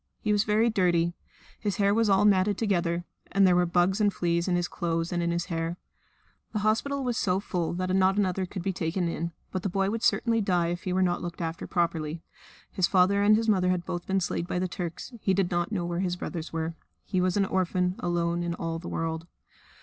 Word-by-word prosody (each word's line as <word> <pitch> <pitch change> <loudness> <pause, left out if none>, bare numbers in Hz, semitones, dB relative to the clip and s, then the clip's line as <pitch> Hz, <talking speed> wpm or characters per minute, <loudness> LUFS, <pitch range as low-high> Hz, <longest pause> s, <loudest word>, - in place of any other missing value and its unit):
He 215 - -1
was 205 0 +3
very 220 +2 +3
dirty; 175 -4 +2 0.5
his 205 -4 -1
hair 200 +1 +3
was 225 0 +2
all 195 +1 +4
matted 200 0 +3
together; 175 -5 0 0.3
and 195 0 +4
there 180 -1 +5
were 175 0 +3
bugs 180 +4 +2
and 205 -1 +4
fleas 170 -1 0
in 180 - +2
his 175 0 0
clothes 165 -1 -2
and 175 - 0
in 170 - 0
his 170 0 -1
hair. 165 0 -3 0.8
The 215 - 0
hospital 275 +6 +1
was 245 -3 -1
so 185 -1 +1
full 180 -5 -2
that 185 +1 -1
not 190 +1 +3
another 190 -2 0
could 185 -1 -6
be 195 - -1
taken 175 +1 -1
in. 170 0 -3 0.2
But 185 - -2
the 195 - -1
boy 195 +2 0
would 230 0 -2
certainly 230 -1 +2
die 180 -4 +1
if 175 +1 -4
he 185 - -1
were 185 +1 +2
not 175 -1 0
looked 175 -1 -6
after 165 -1 -4
properly. 165 -2 -1 0.5
His 185 -2 +2
father 195 +2 +3
and 210 +1 +6
his 225 +1 0
mother 185 -4 +3
had 180 -1 0
both 175 -1 -4
been 195 0 +1
slain 170 - -1
by 180 - -3
the 185 +1 0
Turks; 180 +5 -6
he 190 - +2
did 190 -2 +1
not 175 +2 0
know 180 -5 -1
where 175 0 -2
his 180 -2 0
brothers 170 -2 -5
were. 165 0 -2 0.3
He 185 - 0
was 185 +1 +1
an 200 - +3
orphan 180 -1 0
alone 170 0 0
in 170 0 -2
all 165 -1 -3
the 175 - -7
world. 165 0 -3
180 Hz, 235 wpm, -27 LUFS, 170-195 Hz, 0.8 s, and